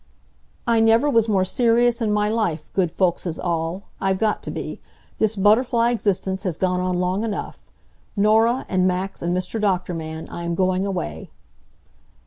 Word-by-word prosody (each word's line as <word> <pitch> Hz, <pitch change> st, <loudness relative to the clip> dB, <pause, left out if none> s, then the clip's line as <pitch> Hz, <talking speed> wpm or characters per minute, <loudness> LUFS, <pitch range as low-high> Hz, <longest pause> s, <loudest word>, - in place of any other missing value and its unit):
"I 230 Hz, -1 st, +3 dB
never 225 Hz, +5 st, +4 dB
was 230 Hz, -2 st, +3 dB
more 190 Hz, -3 st, +2 dB
serious 235 Hz, +3 st, +2 dB
in 220 Hz, -2 st, +1 dB
my 210 Hz, 0 st, +2 dB
life, 215 Hz, -8 st, -1 dB
good 185 Hz, -3 st, +1 dB
folkses 175 Hz, -1 st, 0 dB
all. 170 Hz, +2 st, -2 dB, 0.2 s
I've 190 Hz, -1 st, +1 dB
got 215 Hz, +1 st, 0 dB
to -, -, -7 dB
be. -, -, -6 dB, 0.4 s
This 220 Hz, 0 st, +1 dB
butterfly 230 Hz, +4 st, +3 dB
existence 190 Hz, -4 st, -1 dB
has 180 Hz, -6 st, -3 dB
gone 180 Hz, -1 st, 0 dB
on 180 Hz, -1 st, -1 dB
long 180 Hz, +3 st, 0 dB
enough. 220 Hz, -3 st, -4 dB, 0.5 s
Norah, 225 Hz, +4 st, +3 dB
and 185 Hz, -1 st, +2 dB
Max, 185 Hz, +2 st, -2 dB
and 175 Hz, +1 st, 0 dB
Mr. 185 Hz, +4 st, -3 dB
Doctor 185 Hz, -3 st, 0 dB
Man, 160 Hz, -1 st, -6 dB
I 170 Hz, -, -6 dB
am 170 Hz, 0 st, -2 dB
going 185 Hz, +1 st, +1 dB
away." 80 Hz, -, -4 dB
195 Hz, 165 wpm, -22 LUFS, 180-225 Hz, 0.5 s, never